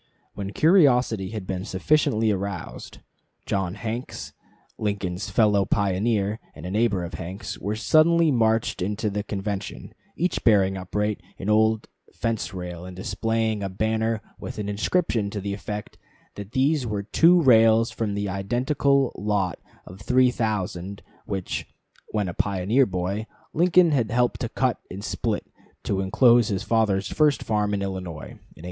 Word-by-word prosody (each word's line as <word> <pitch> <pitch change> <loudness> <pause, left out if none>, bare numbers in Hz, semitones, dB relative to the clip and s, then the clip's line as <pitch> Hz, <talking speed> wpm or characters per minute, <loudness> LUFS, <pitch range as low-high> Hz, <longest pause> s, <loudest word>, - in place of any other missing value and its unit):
When 100 -1 -5
curiosity 125 - +3
had 110 -4 -6
been 95 -1 -3
sufficiently 110 +1 +1
aroused, 100 -2 -5 0.5
John 95 -2 -1
Hanks, 115 +3 -5 0.5
Lincoln's 100 -2 -2
fellow 105 -1 +3
pioneer, 100 +2 0 0.2
and 80 - -10
a 90 - -4
neighbor 105 -3 +1
of 85 +1 -6
Hanks, 95 +2 -6
were 105 +2 -2
suddenly 160 +7 +4
marched 115 -4 +1
into 105 +3 -1
the 105 +1 -2
convention, 100 -1 -5 0.2
each 180 +3 -1
bearing 95 -4 +4
upright 105 +2 -2 0.2
an 100 +3 -2
old 110 0 +3 0.3
fence 115 -1 -2
rail, 90 -2 -6
and 90 0 -9
displaying 110 +3 -1
a 100 - -2
banner 110 +3 -1 0.2
with - - -7
an 105 -1 -3
inscription 105 - 0
to 105 - -4
the 100 0 -3
effect 105 +1 -6 0.3
that 100 +1 -9
these 135 0 +2
were 105 -2 -2
two 170 - +5
rails 115 -5 +5
from 105 -3 -2
the 100 0 -2
identical 125 +7 +1
lot 100 -3 -1 0.3
of 95 +2 -12
three 125 +3 +3
thousand 100 -4 -3 0.2
which, 95 -3 -3 0.4
when 105 -3 -1
a 90 - -4
pioneer 100 +8 +1
boy, 95 +4 -3 0.3
Lincoln 175 0 +4
had 120 -7 +1
helped 120 +3 +1
to 120 - -2
cut 130 0 0
and 95 +2 -7
split - - -2 0.4
to 95 -1 -1
inclose 120 +4 +4
his 95 -3 -2
father's 105 -4 +1
first 150 -2 +2
farm 105 -2 0
in 100 - -2
Illinois, 90 -5 -6
in - - -16
1830. - - -23
105 Hz, 155 wpm, -24 LUFS, 95-115 Hz, 0.5 s, two